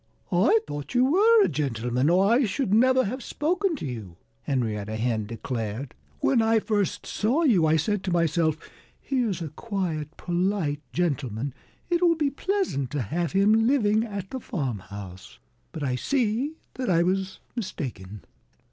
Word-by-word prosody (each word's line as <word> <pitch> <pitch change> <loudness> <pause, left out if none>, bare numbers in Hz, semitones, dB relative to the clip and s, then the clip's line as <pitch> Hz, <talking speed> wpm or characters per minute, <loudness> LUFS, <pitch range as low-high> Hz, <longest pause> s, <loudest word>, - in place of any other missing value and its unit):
"I 190 +5 +4
thought 145 - -6
you 250 +1 +5
were 435 +5 +6
a - - +3
gentleman, 125 -1 0
or 185 +3 +4
I 240 +6 +4
should 205 +1 -1
never 260 +3 +5
have 255 +7 -4
spoken 350 +7 0
to 265 - -6
you," 110 -10 -7 0.2
Henrietta 110 -6 -2
Hen 110 -2 -1
declared. 115 +2 -4 0.3
"When 250 -4 +3
I 225 0 +3
first 210 -3 -1
saw 250 +10 +1
you 195 - +4
I 155 - +4
said 200 +5 0
to 185 - -1
myself, 165 -2 +2 0.4
'Here's 230 -10 -1
a 160 - -5
quiet, 165 -5 -4
polite 175 -4 -1
gentleman! 135 -5 -1 0.4
It 345 0 +2
will 340 -2 +5
be 295 -3 0
pleasant 355 - -1
to 145 -4 0
have 170 - -2
him 215 +3 +4
living 220 -5 +3
at 200 -4 -6
the 260 - -3
farmhouse.' 100 - -6 0.3
But 150 - -6
I 130 -2 0
see 245 - 0 0.2
that 255 -4 -3
I 170 -2 +4
was 190 +1 -1 0.2
mistaken." 105 - -5
180 Hz, 155 wpm, -26 LUFS, -, 0.4 s, were